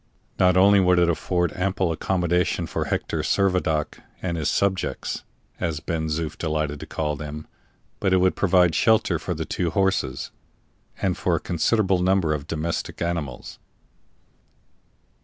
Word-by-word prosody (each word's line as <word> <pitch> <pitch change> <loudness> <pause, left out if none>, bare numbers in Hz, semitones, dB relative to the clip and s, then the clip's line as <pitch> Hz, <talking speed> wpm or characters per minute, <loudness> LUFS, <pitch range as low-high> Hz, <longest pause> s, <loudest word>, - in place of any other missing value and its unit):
Not 90 0 +4
only 100 +2 +6
would 90 -1 +4
it 85 -1 +4
afford 90 0 -1
ample 95 -1 0
accommodation 90 +1 0
for - - -3
Hector - - -2
Servadac 90 -6 0 0.2
and 90 -2 -2
"his 80 -2 -1
subjects," 95 -2 -1 0.4
as 80 -4 -2
Ben 80 0 -2
Zoof 80 0 -3
delighted 75 -2 -2
to - - -8
call 75 -1 -2
them, 75 +1 -7 0.5
but 95 - +1
it 95 - +5
would 90 0 +3
provide 90 -3 +3
shelter 110 -6 +3
for 90 +1 -3
the 80 +1 -3
two 85 +1 -1
horses, 95 -7 0 0.7
and - - +1
for - - 0
a - - 0
considerable 95 +2 +1
number 90 -4 +2
of 75 -1 -4
domestic 80 +1 -3
animals. 85 -7 -4
85 Hz, 145 wpm, -24 LUFS, 80-95 Hz, 0.7 s, only